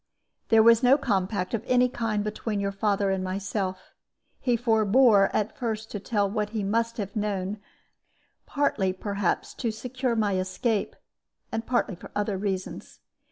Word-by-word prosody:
"There 220 Hz, -1 st, +6 dB
was 230 Hz, 0 st, +6 dB
no 260 Hz, +2 st, +6 dB
compact 190 Hz, -6 st, -1 dB
of 225 Hz, -, -1 dB
any 250 Hz, 0 st, +4 dB
kind 225 Hz, -4 st, -2 dB
between 210 Hz, 0 st, -3 dB
your 200 Hz, 0 st, -1 dB
father 200 Hz, 0 st, 0 dB
and 190 Hz, -1 st, -1 dB
myself. 190 Hz, 0 st, -3 dB, 0.5 s
He 245 Hz, -2 st, +1 dB
forbore 220 Hz, -2 st, +4 dB
at 215 Hz, +1 st, -1 dB
first 220 Hz, -3 st, -4 dB
to 205 Hz, -, -4 dB
tell 205 Hz, 0 st, 0 dB
what 210 Hz, +1 st, -2 dB
he 215 Hz, -1 st, -3 dB
must 230 Hz, +3 st, 0 dB
have 200 Hz, -1 st, -5 dB
known, 205 Hz, -1 st, -2 dB, 0.9 s
partly, 220 Hz, -10 st, 0 dB
perhaps, 200 Hz, -1 st, -2 dB
to 235 Hz, -, -2 dB
secure 250 Hz, +2 st, -2 dB
my 205 Hz, -4 st, +1 dB
escape, 185 Hz, +4 st, -1 dB, 0.6 s
and 225 Hz, 0 st, -3 dB
partly 240 Hz, -4 st, +1 dB
for 175 Hz, -, -11 dB
other 205 Hz, -1 st, 0 dB
reasons. 190 Hz, -2 st, -4 dB
210 Hz, 155 wpm, -26 LUFS, 195-230 Hz, 0.9 s, There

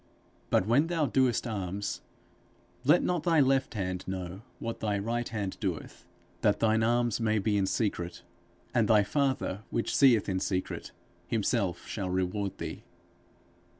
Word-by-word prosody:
But 90 Hz, -, +3 dB
when 130 Hz, +9 st, +3 dB
thou 165 Hz, -3 st, +1 dB
doest 130 Hz, -4 st, +2 dB
alms, 100 Hz, -3 st, -3 dB, 0.8 s
let 150 Hz, +6 st, +5 dB
not 175 Hz, -2 st, +1 dB
thy 165 Hz, -2 st, +3 dB
left 135 Hz, -3 st, +2 dB
hand 95 Hz, -2 st, -2 dB
know 95 Hz, 0 st, -5 dB, 0.2 s
what 115 Hz, 0 st, -5 dB
thy 105 Hz, -2 st, 0 dB
right 115 Hz, +4 st, -2 dB
hand 105 Hz, -4 st, -3 dB
doeth; 90 Hz, -4 st, -4 dB, 0.3 s
that 105 Hz, -2 st, +3 dB
thine 110 Hz, 0 st, +3 dB
alms 120 Hz, 0 st, +2 dB
may 110 Hz, -1 st, +2 dB
be 105 Hz, +1 st, +1 dB
in 100 Hz, -1 st, +2 dB
secret; 90 Hz, -6 st, -2 dB, 0.5 s
and 115 Hz, -3 st, +3 dB
thy 105 Hz, -2 st, +5 dB
father 130 Hz, -4 st, 0 dB
which 115 Hz, -, -1 dB
seeth 125 Hz, -7 st, +5 dB
in 95 Hz, -2 st, 0 dB
secret, 95 Hz, -1 st, -3 dB, 0.4 s
himself 105 Hz, -3 st, 0 dB
shall 95 Hz, -4 st, -4 dB
reward 95 Hz, +2 st, -1 dB
thee. -, -, -6 dB
110 Hz, 150 wpm, -29 LUFS, 95-120 Hz, 0.8 s, let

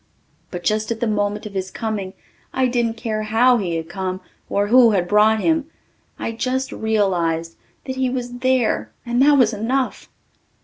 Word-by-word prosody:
But 175 Hz, -1 st, -6 dB
just 215 Hz, 0 st, 0 dB
at 225 Hz, -, -2 dB
the 240 Hz, -, 0 dB
moment 210 Hz, -1 st, -1 dB
of 210 Hz, -, -7 dB
his 190 Hz, -1 st, -3 dB
coming 205 Hz, -3 st, -4 dB, 0.4 s
I 260 Hz, -, +2 dB
didn't 240 Hz, -2 st, 0 dB
care 220 Hz, -2 st, -3 dB
how 230 Hz, +4 st, +3 dB
he 180 Hz, -6 st, -2 dB
had 165 Hz, 0 st, -4 dB
come 185 Hz, +1 st, -4 dB, 0.3 s
or 200 Hz, 0 st, +1 dB
who 240 Hz, +2 st, +6 dB
had 185 Hz, -5 st, +1 dB
brought 215 Hz, +2 st, +4 dB
him. 320 Hz, -2 st, +1 dB, 0.5 s
I -, -, -3 dB
just 260 Hz, +3 st, -2 dB
realized 175 Hz, -7 st, 0 dB, 0.3 s
that 260 Hz, -1 st, -5 dB
he 260 Hz, -1 st, +1 dB
was 245 Hz, -1 st, -4 dB
there 245 Hz, -, +1 dB, 0.2 s
and 240 Hz, +1 st, +1 dB
that 285 Hz, +1 st, +6 dB
was 235 Hz, -4 st, +4 dB
enough. 250 Hz, +5 st, -2 dB
220 Hz, 175 wpm, -21 LUFS, 200-250 Hz, 0.5 s, who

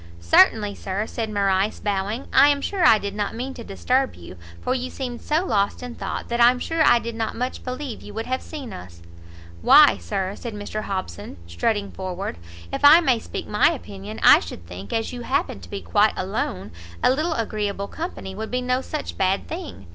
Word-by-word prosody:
"Certainly, 200 Hz, -, +4 dB
Sir," 195 Hz, +2 st, -3 dB
said 225 Hz, -1 st, -4 dB
Morrice, 200 Hz, 0 st, +1 dB
bowing; 205 Hz, +4 st, -2 dB
"I 285 Hz, -, +7 dB
am 285 Hz, -1 st, +2 dB
sure 370 Hz, +6 st, -2 dB
I 225 Hz, -, +7 dB
did 200 Hz, -1 st, -5 dB
not 205 Hz, +1 st, -3 dB
mean 260 Hz, +3 st, -4 dB
to 240 Hz, -, -9 dB
disturb 255 Hz, +7 st, 0 dB
you; 85 Hz, +1 st, -11 dB, 0.2 s
for 255 Hz, -, -1 dB
you 255 Hz, 0 st, -3 dB
seemed 245 Hz, -3 st, -6 dB
so 315 Hz, +4 st, 0 dB
lost 200 Hz, -, 0 dB
in 245 Hz, -1 st, -6 dB
thought, -, -, -5 dB
that 235 Hz, 0 st, 0 dB
I'm 245 Hz, +1 st, +6 dB
sure 325 Hz, +5 st, -2 dB
I -, -, +6 dB
did 235 Hz, 0 st, -4 dB
not 225 Hz, -1 st, -3 dB
much 250 Hz, +2 st, -4 dB
believe 255 Hz, -1 st, -5 dB
you -, -, -10 dB
would 225 Hz, +1 st, -3 dB
have 260 Hz, +1 st, -2 dB
seen 280 Hz, -8 st, -8 dB
us." 85 Hz, -1 st, -11 dB, 0.6 s
"Why -, -, +7 dB
Sir," 185 Hz, -, -3 dB
said 235 Hz, -3 st, -7 dB
Mr 210 Hz, +1 st, -5 dB
Hobson, 100 Hz, -, -5 dB
strutting 200 Hz, -, -1 dB
forward, 185 Hz, -, -5 dB, 0.4 s
"if -, -, -3 dB
I 295 Hz, +4 st, +9 dB
may 260 Hz, -9 st, +2 dB
speak -, -, -6 dB
my -, -, +3 dB
opinion, 205 Hz, -6 st, -8 dB
I -, -, +9 dB
should 85 Hz, 0 st, -9 dB
think, 90 Hz, +3 st, -9 dB
as 225 Hz, +2 st, -2 dB
you 245 Hz, -, -6 dB
happen 235 Hz, -, -1 dB
to 85 Hz, -2 st, -13 dB
be 95 Hz, -, -5 dB
quite 85 Hz, 0 st, +3 dB
alone, 95 Hz, +3 st, -3 dB, 0.3 s
a -, -, +5 dB
little 315 Hz, +5 st, 0 dB
agreeable 205 Hz, -4 st, -2 dB
company 315 Hz, -, -6 dB
would 220 Hz, +3 st, -5 dB
be 250 Hz, 0 st, -1 dB
no 250 Hz, +1 st, 0 dB
such 305 Hz, +2 st, -6 dB
bad 190 Hz, +1 st, +1 dB
thing. 325 Hz, -, -7 dB
220 Hz, 205 wpm, -23 LUFS, 195-255 Hz, 0.6 s, I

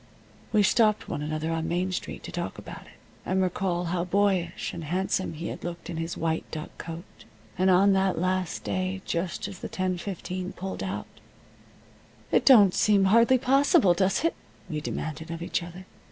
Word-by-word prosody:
We 210 Hz, -2 st, +4 dB
stopped 215 Hz, +1 st, +3 dB
one -, -, -3 dB
another 155 Hz, +2 st, -2 dB
on 165 Hz, 0 st, -1 dB
Main 180 Hz, +2 st, 0 dB
Street 180 Hz, -, -5 dB
to -, -, -7 dB
talk -, -, -4 dB
about -, -, -10 dB
it, -, -, -18 dB, 0.3 s
and 190 Hz, -, 0 dB
recall 180 Hz, -1 st, 0 dB
how 175 Hz, -1 st, 0 dB
boyish 185 Hz, -2 st, 0 dB
and 165 Hz, -, -6 dB
handsome 185 Hz, +2 st, -1 dB
he 165 Hz, +2 st, -5 dB
had -, -, -7 dB
looked 175 Hz, 0 st, -6 dB
in 165 Hz, -, -5 dB
his 165 Hz, +1 st, -3 dB
white 160 Hz, 0 st, -1 dB
duck 155 Hz, -1 st, -7 dB
coat, 165 Hz, +1 st, -7 dB, 0.5 s
and 185 Hz, +1 st, +2 dB
on 195 Hz, +2 st, +5 dB
that 190 Hz, -1 st, +2 dB
last 185 Hz, 0 st, -1 dB
day 185 Hz, +1 st, -2 dB
just 170 Hz, +3 st, -2 dB
as 195 Hz, -3 st, -9 dB
the -, -, -6 dB
10:15 185 Hz, 0 st, -3 dB
pulled 190 Hz, +1 st, -5 dB
out. 190 Hz, -, -3 dB, 1.3 s
"It -, -, +3 dB
don't 210 Hz, -9 st, +8 dB
seem 205 Hz, -2 st, +4 dB
hardly 230 Hz, +6 st, +5 dB
possible, 275 Hz, -, +4 dB
does 190 Hz, -, +1 dB
it?" 330 Hz, -, +2 dB, 0.3 s
we 155 Hz, -4 st, -3 dB
demanded 160 Hz, +1 st, -5 dB
of 165 Hz, 0 st, -5 dB
each 175 Hz, -, -1 dB
other. 175 Hz, +2 st, -9 dB
185 Hz, 180 wpm, -27 LUFS, 170-195 Hz, 1.3 s, don't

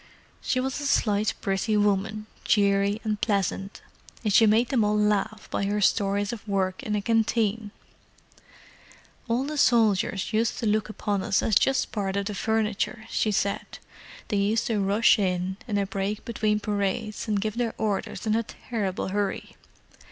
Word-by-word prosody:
She 255 Hz, -, 0 dB
was 265 Hz, +2 st, -2 dB
a 285 Hz, -, -2 dB
slight, 210 Hz, -5 st, +1 dB
pretty 200 Hz, +2 st, 0 dB
woman, 210 Hz, +1 st, 0 dB, 0.2 s
cheery 200 Hz, 0 st, +2 dB
and 215 Hz, -2 st, -2 dB
pleasant, 195 Hz, -1 st, -1 dB, 0.4 s
and 210 Hz, -3 st, +1 dB
she 225 Hz, -, +6 dB
made 225 Hz, +3 st, +3 dB
them 245 Hz, -5 st, +2 dB
all 210 Hz, 0 st, +2 dB
laugh 210 Hz, +1 st, 0 dB
by 200 Hz, -, -1 dB
her 205 Hz, +1 st, 0 dB
stories 200 Hz, +1 st, +1 dB
of 220 Hz, -1 st, -9 dB
work 190 Hz, -2 st, -1 dB
in 210 Hz, -, -2 dB
a 205 Hz, -, -2 dB
canteen. 225 Hz, -1 st, +1 dB, 1.6 s
"All 235 Hz, +2 st, +1 dB
the 300 Hz, +1 st, -3 dB
soldiers 220 Hz, -5 st, +2 dB
used 220 Hz, +1 st, +1 dB
to 230 Hz, -, -3 dB
look 215 Hz, 0 st, +1 dB
upon 205 Hz, -2 st, -2 dB
us 195 Hz, -, +1 dB
as 220 Hz, -, 0 dB
just 270 Hz, +6 st, +2 dB
part 200 Hz, -3 st, -2 dB
of 200 Hz, 0 st, -1 dB
the 210 Hz, -, -3 dB
furniture," 220 Hz, +2 st, -1 dB
she 215 Hz, -, +1 dB
said. 200 Hz, 0 st, -2 dB, 0.5 s
"They 210 Hz, -, 0 dB
used 210 Hz, +3 st, +1 dB
to 225 Hz, -3 st, 0 dB
rush 205 Hz, +3 st, +4 dB
in, 185 Hz, -1 st, -1 dB
in 210 Hz, -3 st, -1 dB
a 200 Hz, -, +1 dB
break 195 Hz, +2 st, -3 dB
between 215 Hz, -2 st, 0 dB
parades, 205 Hz, +2 st, -2 dB
and 210 Hz, -2 st, +1 dB
give 215 Hz, +2 st, -3 dB
their 235 Hz, -2 st, -1 dB
orders 210 Hz, 0 st, -2 dB
in 215 Hz, -, +1 dB
a 230 Hz, -, +2 dB
terrible 210 Hz, -5 st, -4 dB
hurry. 200 Hz, 0 st, -3 dB
210 Hz, 170 wpm, -26 LUFS, 200-220 Hz, 1.6 s, she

